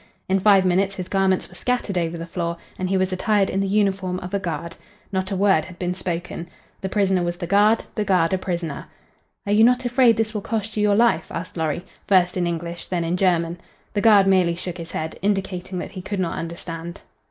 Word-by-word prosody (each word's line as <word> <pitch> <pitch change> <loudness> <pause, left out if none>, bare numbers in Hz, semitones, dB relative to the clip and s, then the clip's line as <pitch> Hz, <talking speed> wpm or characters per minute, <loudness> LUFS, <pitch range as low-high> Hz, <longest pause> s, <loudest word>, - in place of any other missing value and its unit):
In 190 +1 +2
five 195 -1 +5
minutes 190 +2 +2
his 185 -2 -5
garments 190 -1 +1
were - - -17
scattered 250 -6 -2
over 170 -1 -1
the 165 - -5
floor 170 0 -3 0.2
and 185 0 -1
he 195 - +2
was 185 0 0
attired 200 +1 +2
in 195 - 0
the 195 - 0
uniform 195 -2 +1
of 180 +2 -7
a 200 - +1
guard. 170 -2 -4 0.4
Not 190 -1 -1
a 200 - -2
word 190 -4 +3
had 180 -2 -12
been 180 0 -2
spoken. 175 -1 -4 0.3
The 190 - -3
prisoner 190 -2 +2
was 175 0 -2
the 175 - -4
guard, 205 +5 +4
the 215 - -1
guard 185 -4 +2
a 190 - +1
prisoner. 170 -5 -4 0.6
"Are 200 - -2
you 215 +1 +6
not 250 +2 +4
afraid 245 -2 +4
this 220 0 0
will 210 - -2
cost 220 0 -3
you 210 - 0
your 205 -1 +3
life?" 235 +2 +3
asked 180 - -6
Lorry, 160 +1 -2 0.2
first 180 -2 +4
in 180 -2 0
English, 170 0 -4
then 175 -2 -1
in 165 +2 0
German. 175 -2 +1 0.3
The 205 - 0
guard 210 -3 +6
merely 185 -3 +3
shook 180 0 -5
his 165 0 -7
head, 160 0 -4
indicating 190 -2 -1
that - - -5
he 190 -2 -7
could 200 +1 -4
not 175 -3 -1
understand. 170 +1 -6
185 Hz, 225 wpm, -23 LUFS, 175-200 Hz, 0.6 s, you